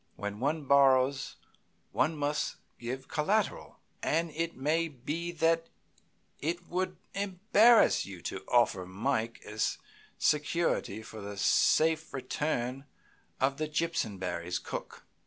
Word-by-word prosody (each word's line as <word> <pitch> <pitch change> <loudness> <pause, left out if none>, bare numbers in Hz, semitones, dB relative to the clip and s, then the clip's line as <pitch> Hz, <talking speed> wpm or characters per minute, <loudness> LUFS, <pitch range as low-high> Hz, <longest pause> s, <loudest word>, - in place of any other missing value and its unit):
When 105 0 -5
one 150 +4 0
borrows 135 -1 +4 0.6
one 160 0 +1
must 145 +1 -1 0.2
give 130 +2 -5
collateral, 195 +8 0 0.2
and 165 +1 0
it 165 +2 -2
may 155 +5 +1
be 155 +5 -4
that 165 0 +2 0.7
it 175 +3 -3
would 185 +1 -2 0.2
embarrass 205 +4 +4
you 95 -2 -9
to - - -4
offer 90 -1 +2
Mike 115 +4 -2
as 105 +1 -1 0.4
security 150 -8 +1
for 110 0 -9
the 100 0 -7
safe 160 +9 +3
return 130 0 -2 0.5
of 135 +1 +1
the 155 - -1
Jimpsonberrys' 95 - -2
cook. - - -7
145 Hz, 115 wpm, -30 LUFS, 120-165 Hz, 0.7 s, borrows